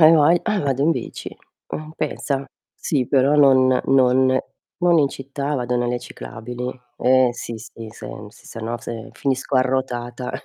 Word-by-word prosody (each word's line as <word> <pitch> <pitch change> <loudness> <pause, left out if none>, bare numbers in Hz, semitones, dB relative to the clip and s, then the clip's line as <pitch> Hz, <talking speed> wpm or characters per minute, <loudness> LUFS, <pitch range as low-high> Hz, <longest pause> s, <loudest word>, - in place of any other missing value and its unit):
ai 160 +1 +9
vogl 165 +3 +5
ah 215 -3 +1
vado 135 -1 0
in 160 - +4
bici, - - -6 0.4
uhm, 155 0 -5
pensa. 140 -1 -2 0.3
Sì, 135 -6 -1
però 140 +2 +3
non 130 -3 +5
non 130 0 +4 0.4
non 175 -2 +4
in 140 -2 +4
città, 140 +2 -4
vado 125 -1 -1
nelle 120 0 0
ciclabili. 125 +1 -7 0.3
Eh 130 0 +4
sì, 120 -1 -6
sì 115 0 -10
se, 110 -1 -10
mhmm, 105 0 -8
si 115 - -19
se 115 - -8
no 115 +2 -3
se 115 -1 -7
finisco 135 0 -1
arrotata 125 -1 -1
130 Hz, 165 wpm, -22 LUFS, 120-140 Hz, 0.4 s, ai